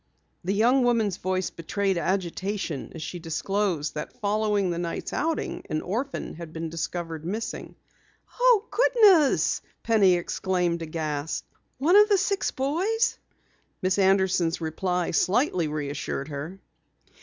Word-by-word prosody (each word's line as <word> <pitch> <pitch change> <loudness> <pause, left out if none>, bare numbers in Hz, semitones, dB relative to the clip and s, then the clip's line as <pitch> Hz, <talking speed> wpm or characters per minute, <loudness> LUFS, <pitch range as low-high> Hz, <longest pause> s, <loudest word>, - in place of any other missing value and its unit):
The 190 +3 0
young 245 +5 +4
woman's 225 -6 +2
voice 185 0 -1
betrayed 195 +4 -1
agitation 185 -2 -2
as 160 - -6
she 165 +3 -5
disclosed 165 0 -1
that 150 +10 -7
following 205 -3 +1
the 170 - -2
night's 170 -1 -4
outing, 325 -1 -1
an 155 - -2
orphan 245 +9 -3
had 165 -1 -9
been 165 0 -4
discovered 165 -1 -4
missing. 210 +7 -5 0.6
"Oh, 485 -4 +5
goodness!" 420 - +4 0.2
Penny 205 -5 +4
exclaimed, 175 -1 -1
aghast. 155 -2 -3 0.3
"One 315 +8 +3
of 420 +1 +7
those 400 -3 +4
six 395 0 0
boys?" 375 - 0 0.6
Miss 185 +2 +2
Anderson's 190 -3 +3
reply 180 +2 -1
slightly 185 - +2
reassured 145 -1 -4
her. 150 +6 -6
185 Hz, 125 wpm, -26 LUFS, 165-235 Hz, 0.6 s, of